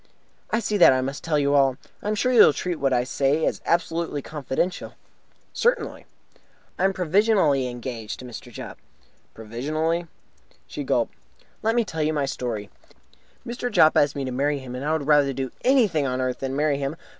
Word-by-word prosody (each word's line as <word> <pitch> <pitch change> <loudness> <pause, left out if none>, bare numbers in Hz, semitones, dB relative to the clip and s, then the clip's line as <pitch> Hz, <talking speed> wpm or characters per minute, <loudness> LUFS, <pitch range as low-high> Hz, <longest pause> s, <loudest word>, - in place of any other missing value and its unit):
"I 220 - +1
see 210 -2 -1
that 175 - +8
I 130 - +1
must 135 +2 -4
tell 160 -2 +1
you 140 -1 +2
all. 135 -2 +3 0.2
I - - -6
am 215 - +1
sure 250 +5 +1
you 240 - +5
will - - +7
treat 175 +4 -3
what 135 -1 +1
I 125 -1 +2
say 140 +4 +1
as - - -1
absolutely 165 -3 0
confidential." 150 +4 -3 0.6
"Certainly." - - 0 0.7
"I 185 - +3
am 195 - +3
provisionally 180 - +2
engaged 120 -3 -6
to 130 - -10
Mr. 120 -3 -9
Jopp." - - -9 0.6
"Provisionally?" 155 +10 -2 0.6
She - - -6
gulped. - - 0 0.5
"Let 225 +1 +1
me 235 -2 +2
tell 160 -5 -4
you 155 +1 +1
my 145 -2 0
story. 115 -6 -4 0.7
Mr. 245 +1 -4
Jopp 155 - +5
asked 145 0 +3
me 140 -1 -3
to 130 - -4
marry 140 +3 0
him, 130 -2 -8
and 125 +2 -5
I 150 - 0
would 160 -3 -1
rather 145 -2 +4
do 130 -1 -4
anything 215 - +3
on 130 0 -2
earth 130 -1 -2
than 135 0 -3
marry 145 -1 +1
him. 140 +2 -3
145 Hz, 190 wpm, -24 LUFS, 130-170 Hz, 0.7 s, that